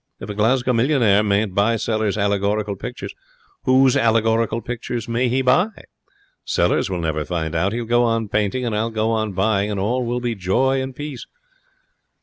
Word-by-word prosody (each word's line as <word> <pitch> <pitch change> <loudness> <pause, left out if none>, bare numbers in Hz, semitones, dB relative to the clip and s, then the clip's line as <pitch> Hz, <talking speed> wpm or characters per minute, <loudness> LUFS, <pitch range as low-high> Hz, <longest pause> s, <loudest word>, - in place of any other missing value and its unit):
'If 105 - -6
a - - -4
Glasgow 125 +5 +1
millionaire 115 -5 +3
mayn't 105 -1 0
buy 105 +4 +2
Sellers' 110 -2 -1
allegorical 100 0 0
pictures, - - -7 0.5
whose 130 0 +4
allegorical 115 0 +2
pictures 120 -1 -5
may 120 +2 0
he 130 +2 +1
buy? 150 +10 +4 0.8
Sellers - - +1
will 90 -2 -3
never 80 -2 -1
find 80 -1 -3
out. 90 +5 +1
He'll 120 +1 -3
go 120 +1 +2
on 115 -2 0
painting 105 +5 -1
and 115 -3 -1
I'll 110 +2 0
go 110 0 -1
on 110 -2 -1
buying, 100 +1 +1
and 100 -2 -2
all 120 +6 0
will 120 +1 -2
be 120 -1 -2
joy 125 +8 +1
and 130 -1 -6
peace.' 145 -3 -7
110 Hz, 175 wpm, -21 LUFS, 100-120 Hz, 0.8 s, whose